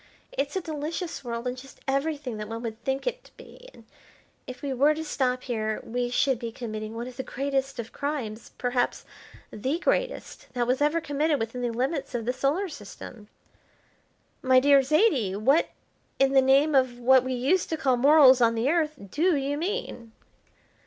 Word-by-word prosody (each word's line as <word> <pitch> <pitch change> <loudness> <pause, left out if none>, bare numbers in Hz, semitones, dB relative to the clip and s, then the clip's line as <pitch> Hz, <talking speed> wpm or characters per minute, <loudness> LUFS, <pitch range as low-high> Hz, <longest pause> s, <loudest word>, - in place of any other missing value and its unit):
It's 280 +4 -3
a 380 - 0
delicious 325 +2 -5
world, 235 -1 -4
and 250 0 -2
just 260 +1 -13
everything 275 -3 -1
that 210 0 -5
one 230 +1 -5
would 225 0 -6
think 270 0 -2
it - - -3
to - - -18
be; - - -14
but - - -17 0.6
if 255 +3 -9
we 275 -2 -2
were 285 +4 +3
to 320 - -4
stop 255 -4 -1
here 220 -3 -2
we 245 +1 -2
should 255 0 +1
be 235 -2 -5
committing 215 -2 -6
one 235 +1 -4
of 255 - -10
the - - -2
greatest 270 +1 -2
of 235 -1 -6
crimes, 255 -7 -4
perhaps 245 0 -1 0.5
the 265 +9 -2
greatest, - - -2
that 240 -2 -1
ever 300 +2 +2
was 325 - -13
committed 290 +1 +1
within 230 +2 -4
the 245 - 0
limits 260 +4 -2
of 230 -2 -2
the 250 - 0
Solar 285 +10 0
System." 215 - -10 1.1
"My 260 -1 +5
dear 280 +1 +5
Zaidie, 270 - +2
what, 270 +10 +3 0.5
in 270 0 +3
the 270 - +6
name 275 +4 +4
of 255 -3 +2
what 255 +1 +5
we 260 0 -2
used 285 +9 +1
to 320 - -1
call 265 -4 +2
morals 265 0 +6
on 230 -1 +4
the 235 +5 +1
Earth, 315 -3 +1 0.2
do 340 +3 +2
you 280 0 -1
mean?" 325 - -4
265 Hz, 185 wpm, -26 LUFS, 240-295 Hz, 1.1 s, the